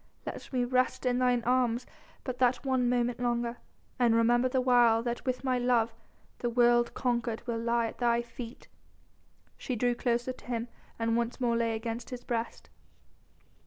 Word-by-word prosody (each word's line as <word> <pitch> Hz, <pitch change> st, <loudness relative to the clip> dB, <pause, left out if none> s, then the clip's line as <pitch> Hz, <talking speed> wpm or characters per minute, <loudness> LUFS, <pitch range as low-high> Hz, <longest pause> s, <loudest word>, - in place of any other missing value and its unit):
Let -, -, -7 dB
me 255 Hz, -2 st, +1 dB
rest 255 Hz, +1 st, 0 dB
in 250 Hz, 0 st, +2 dB
thine 250 Hz, -2 st, +2 dB
arms 250 Hz, -1 st, +1 dB, 0.4 s
but 250 Hz, -2 st, -5 dB
that 250 Hz, +2 st, +2 dB
one 260 Hz, -2 st, +2 dB
moment 245 Hz, 0 st, 0 dB
longer, 240 Hz, -1 st, -1 dB, 0.4 s
and 235 Hz, -2 st, +4 dB
remember 240 Hz, +2 st, +3 dB
the 260 Hz, -, +1 dB
while 240 Hz, -3 st, +4 dB
that 240 Hz, 0 st, -3 dB
with 255 Hz, 0 st, -1 dB
my 255 Hz, -2 st, +1 dB
love, 240 Hz, -2 st, +2 dB, 0.5 s
the 240 Hz, -, -1 dB
world 240 Hz, 0 st, +3 dB
conquered 235 Hz, -2 st, -1 dB
will 235 Hz, -2 st, -2 dB
lie 235 Hz, 0 st, +1 dB
at 225 Hz, -, -6 dB
thy 235 Hz, -1 st, +2 dB
feet." 235 Hz, 0 st, -9 dB, 0.9 s
She 255 Hz, -, -3 dB
drew 245 Hz, +2 st, +1 dB
closer 240 Hz, +1 st, -1 dB
to -, -, -17 dB
him 240 Hz, -1 st, -3 dB, 0.3 s
and 230 Hz, 0 st, 0 dB
once 235 Hz, +2 st, -1 dB
more 240 Hz, -2 st, +1 dB
lay 230 Hz, -1 st, +1 dB
against 230 Hz, +1 st, -5 dB
his 245 Hz, -1 st, -7 dB
breast. 230 Hz, -1 st, -4 dB
240 Hz, 170 wpm, -30 LUFS, 235-250 Hz, 0.9 s, and